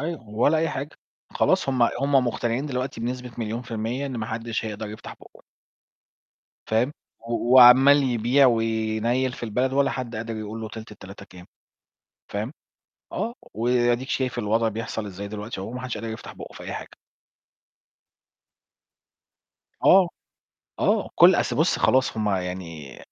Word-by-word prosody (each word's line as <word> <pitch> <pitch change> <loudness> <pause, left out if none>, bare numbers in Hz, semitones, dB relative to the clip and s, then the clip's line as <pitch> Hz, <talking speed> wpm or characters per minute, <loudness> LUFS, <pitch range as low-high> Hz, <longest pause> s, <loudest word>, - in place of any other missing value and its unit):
أيوه، 150 -7 -5
ولا 125 +9 +2
أي 165 - +1
حاجة، 140 0 -5 0.4
خلاص - - +2
هم 130 -3 +1
هم 140 +4 +1
مقطنعين 120 +4 -1
دلوقتي 130 -3 -4
بنسبة 125 +1 -4
مليون 115 +2 -3
في 120 - -14
المِيّة 115 +5 -2
إن 130 -3 -5
ما 110 -1 -3
حدش 115 0 -3
هيقدر 105 0 -5
يفتح 110 0 -9
بُقّه. - - -18 1.3
فاهم، 120 +6 +1 0.3
و 115 +1 -9 0.2
وعَمّال 135 +3 +8
يبيع 125 +2 +3
وينيّل 115 +2 0
في - - -8
البلد 125 +4 0
ولا 140 0 +2
حد 120 -3 -5
قادر 115 0 -4
يقول 110 +1 -6
له 110 - -5
تِلت 110 -1 -9
التلاتة 100 -1 -11
كام، 90 -2 -14 0.8
فاهم، 105 +7 -4 0.6
آه. 225 +5 -3 0.2
وأديك 120 +2 +1
شايف 130 -2 -1
الوضع 115 +1 +1
بيحصل 110 -1 -4
إزاي 100 +1 -7
دلوقتي 105 -1 -6
أهو 100 - -6
ما 125 - -5
حدش 130 -2 -4
قادر 115 - -5
يفتح 110 0 -7
بُقّه - - -10
في - - -10
أي - - -6
حاجة. - - -8 2.9
آه. 185 -1 +7 0.7
آه، - - +1
كل - - +7
أصل - - 0
بُص، - - +2
خلاص 130 -3 +2
هم 105 -1 0
يعني 90 -7 -4
115 Hz, 155 wpm, -24 LUFS, 110-130 Hz, 2.9 s, وعَمّال